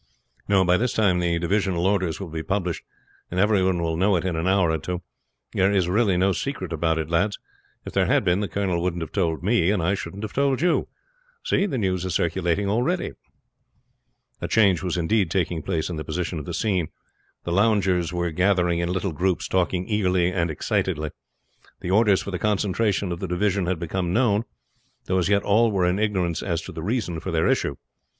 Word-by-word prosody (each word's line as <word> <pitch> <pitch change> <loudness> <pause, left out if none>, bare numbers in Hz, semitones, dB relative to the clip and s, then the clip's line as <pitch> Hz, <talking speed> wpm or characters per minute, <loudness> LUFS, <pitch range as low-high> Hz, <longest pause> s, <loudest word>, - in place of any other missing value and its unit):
"No; 95 -2 +4
by 90 +1 +4
this 125 +4 0
time 95 -5 +2
the 85 -1 +1
divisional 90 0 0
orders 95 -4 +1
will 95 -3 -6
be 80 0 -4
published, 90 -1 -2 0.5
and 90 - -2
everyone 95 -4 +2
will 80 -1 -1
know 95 +4 +2
it 90 +1 -1
in 90 -3 -1
an 80 +3 -1
hour 95 -3 +3
or 80 - -1
two. 90 +3 -4 0.5
There 95 +1 +3
is 95 -4 +2
really 100 0 +2
no 95 +2 +3
secret 95 - -3
about 80 0 0
it, 80 -2 -2
lads. 100 +5 +1 0.5
If - - -7
there - - +2
had - - +3
been 90 +2 +2
the 105 - -1
colonel 90 0 -1
wouldn't 85 -1 -1
have 80 - -8
told 85 -4 -1
me, 95 -3 +2
and 105 -1 +2
I 90 +4 +2
shouldn't 100 +1 -5
have 105 - -5
told 140 -2 +1
you. 175 +4 +1 0.6
See, 200 - +1
the 135 - -2
news 95 -5 0
is 95 -2 -2
circulating 85 +3 0
already." 125 - 0 1.3
A - - -2
change 100 -6 +3
was 90 -2 -2
indeed 95 +2 +1
taking 85 -2 -1
place 80 -2 -2
in 85 - -4
the 75 - -4
position 85 +1 -3
of 75 - -7
the 85 - -5
scene. 95 -6 0 0.6
The 85 - -4
loungers 95 -3 +2
were 85 -1 -1
gathering 90 0 +2
in 85 0 -1
little 95 +1 -1
groups, 90 +2 0
talking 90 0 0
eagerly 90 -4 +1
and 85 -2 0
excitedly. 75 0 -1 0.7
The 90 - -3
orders 105 -1 +4
for 100 - -5
the 90 - -3
concentration 100 -1 0
of 85 - -4
the 95 - -3
divisions 95 +1 0
had 90 -1 0
become 85 +2 -2
known, 115 -2 +2 0.6
though 95 0 +1
as 90 - 0
yet 100 -1 +3
all 110 +3 +3
were 95 -3 +1
in 90 +3 +1
ignorance 95 -6 0
as 85 -4 -1
to 95 - -8
the 80 -2 -7
reason 100 -3 -2
for - - -6
their - - +1
issue. - - +1
95 Hz, 210 wpm, -24 LUFS, 85-100 Hz, 1.3 s, No